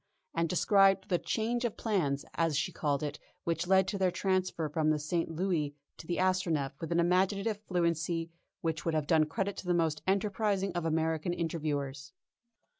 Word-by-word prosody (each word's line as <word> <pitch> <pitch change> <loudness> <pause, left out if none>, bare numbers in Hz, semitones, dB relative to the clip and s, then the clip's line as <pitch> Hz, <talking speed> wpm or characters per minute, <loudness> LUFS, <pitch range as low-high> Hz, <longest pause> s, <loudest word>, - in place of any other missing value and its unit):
_, - - -50 0.3
and 165 0 0
described 195 +2 +4
the 175 -2 +2
"change 235 +2 -1
of 235 -3 -2
plans," 155 -11 0
as 165 -3 +1
she 165 +4 0
called 145 -3 -1
it, 150 0 -4 0.2
which 170 +1 -1
led 190 0 +4
to 200 0 -2
their 190 -1 +3
transfer 185 -2 0
from 155 +1 0
the 155 - +3
St. 165 +3 -1
Louis 160 -4 -1 0.2
to 160 - -11
the 175 - -1
Astronef 185 -7 +1
with 165 - -4
an 170 - +2
imaginative 195 +4 +1
fluency 170 -1 0 0.3
which 160 -1 -2
would 165 -2 0
have 155 -2 +1
done 155 0 +4
credit 195 +5 -2
to 185 - -7
the 175 - +3
most 160 -3 +1
enterprising 195 -1 +1
of 175 -2 -2
American 160 +1 0
interviewers. 145 -5 -3
170 Hz, 185 wpm, -31 LUFS, 155-190 Hz, 0.3 s, described